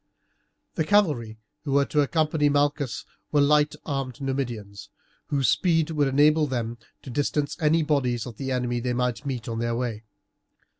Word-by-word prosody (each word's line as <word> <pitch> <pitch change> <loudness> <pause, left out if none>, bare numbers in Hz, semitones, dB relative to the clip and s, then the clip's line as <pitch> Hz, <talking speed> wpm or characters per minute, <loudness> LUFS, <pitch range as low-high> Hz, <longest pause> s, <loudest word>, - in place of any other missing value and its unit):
The 160 - 0
cavalry 150 - +2 0.3
who 140 -3 -2
were 140 0 +4
to 150 - +1
accompany 150 0 +1
Malchus 145 -2 0 0.3
were 150 - +3
light 150 +1 +3
armed 135 -4 -3
Numidians, 120 -7 -4 0.4
whose 140 -3 +1
speed 165 - +2
would 145 -3 +1
enable 150 +3 +4
them 120 -3 -3 0.2
to 130 - -8
distance 145 +2 -1
any 160 0 +3
bodies 130 -6 0
of 120 -4 -9
the 135 -1 -4
enemy 125 -1 -1
they 125 +1 -2
might 125 +3 -1
meet 125 -5 -4
on 115 -1 -3
their 115 0 -1
way. 115 -3 -3
135 Hz, 160 wpm, -25 LUFS, 120-150 Hz, 0.4 s, were